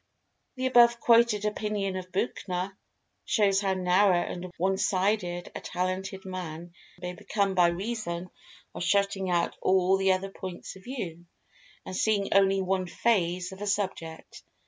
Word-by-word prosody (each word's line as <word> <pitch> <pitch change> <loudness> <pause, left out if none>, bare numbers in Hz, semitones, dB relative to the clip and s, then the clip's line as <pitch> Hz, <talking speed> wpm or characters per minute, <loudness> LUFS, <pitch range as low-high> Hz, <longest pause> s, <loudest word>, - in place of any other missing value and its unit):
The 260 0 -3
above 240 -2 +6
quoted 230 -3 +4
opinion 210 -2 -2
of 185 0 -6
Buchner 190 -2 -2 0.5
shows 200 -2 +2
how 195 -2 0
narrow 185 +1 +4
and 180 0 -6
one 190 +2 +1
sided 185 -2 0
a - - -6
talented 185 +1 -3
man 175 -2 -6 0.3
may 180 0 -5
become 200 +2 -1
by 180 -2 +5
reason 180 -1 -3 0.4
of - - -4
shutting 200 0 +1
out 175 -1 +1
all 190 +1 +3
other 190 +1 -1
points 185 -1 -7
of 190 - -15
view, 175 -10 -6 0.6
and 185 - -6
seeing 205 0 +1
only 195 0 +4
one 185 0 0
phase 180 -4 0
of 190 +1 -10
a 205 - -3
subject. 190 -5 -3
190 Hz, 145 wpm, -28 LUFS, 180-205 Hz, 0.6 s, above